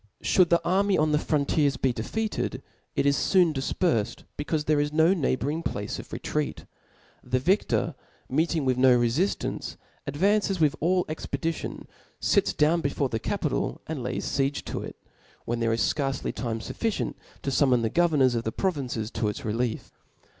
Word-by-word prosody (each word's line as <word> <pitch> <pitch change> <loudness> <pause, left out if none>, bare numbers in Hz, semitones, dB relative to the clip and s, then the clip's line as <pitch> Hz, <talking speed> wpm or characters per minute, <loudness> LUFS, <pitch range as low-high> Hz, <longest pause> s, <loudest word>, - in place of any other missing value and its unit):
Should 180 -3 +4
the 170 - +2
army 195 +2 +3
on 155 0 +2
the 150 - +3
frontiers 145 -1 +1
be 130 -2 +1
defeated, 215 - -3 0.3
it - - +1
is 140 -1 +2
foon 180 -5 +5
difperfed, 135 - 0
becaufe 150 +1 -2
there 150 -1 +3
is 145 0 0
no 160 +4 +4
neighbouring 150 -2 0
place 105 -10 -3
of - - -10
retreat. 150 -1 -3 0.6
The 130 - 0
vic 185 +11 +2
tor^ - - 0 0.3
meeting 160 +1 +1
with 130 -1 +2
no 130 -1 +6
refiftance, 120 +12 -1 0.3
advances 195 +6 +1
with 155 -1 +3
all 180 +2 +2
expedition, 160 +1 -4 0.3
fits - - +2
down 160 +3 +2
before 140 -2 -1
the 115 - -2
capital, - - -2
and 155 -4 -4
lays 125 +1 -3
fiege 140 0 -1
to - - -4
it, - - -7 0.5
when 120 0 -2
there 115 -1 +1
is 115 - 0
fcarcc 135 -3 0
time 115 -2 -3
fufficient 225 - -2 0.3
to 135 - -1
fummon 130 -4 +3
the 110 - +1
governors 150 -7 +3
of 115 -1 -1
the 110 - -2
provinces 130 - -2
to 115 -2 -1
its 110 +6 -4
relief. 115 +1 -2
145 Hz, 170 wpm, -26 LUFS, 125-165 Hz, 0.6 s, no